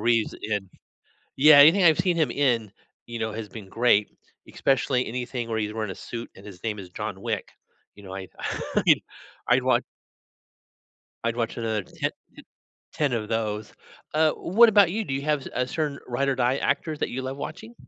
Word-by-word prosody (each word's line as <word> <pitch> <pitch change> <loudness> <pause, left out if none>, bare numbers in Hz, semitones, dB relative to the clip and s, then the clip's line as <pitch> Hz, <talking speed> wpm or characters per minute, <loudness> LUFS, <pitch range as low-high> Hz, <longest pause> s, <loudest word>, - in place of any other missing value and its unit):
Reeves 115 0 +1
in 105 -3 -2 0.7
yeah. 150 0 +9
Anything 165 +6 +7
I've 160 -3 +6
seen 180 -2 +1
him 155 -7 +2
in, 120 -7 +1 0.3
you 120 -1 -6
know, 110 -1 -2
has 110 -1 -6
been 105 -3 -10
great, 115 -3 +3 0.4
especially 135 -1 +1
anything 125 0 -4
where 110 - -1
he's 105 0 -2
wearing 110 -2 -3
a - - -9
suit 115 0 -7
and 95 - -14
his 95 -4 -11
name 105 -2 -2
is 90 -2 -11
John 100 -1 -5
Wick. 115 -5 -3 0.4
You 100 - -15
know, 95 - -9
I 95 -1 -6 0.5
I - - +6 0.5
I'd - - +4
watch - - +2 1.4
I'd 115 0 0
watch 115 0 -2
another 110 -4 -2
10 - - -3 0.8
10 145 -4 0
of 110 -2 -2
those, 110 -2 -2 0.4
uh, 155 0 +3
what 230 +6 +5
about 200 -5 +5
you? 220 +4 -1
Do 135 - -3
you 135 - -2
have 150 -2 0
a 125 0 0
certain 145 0 -2
ride 130 +3 -1
or 135 - +2
die 125 +1 +1
actors 155 -2 -1
that - - -1
you 130 +2 -4
love 130 +1 -4
watching? 225 +10 -7
120 Hz, 190 wpm, -25 LUFS, 110-145 Hz, 1.4 s, yeah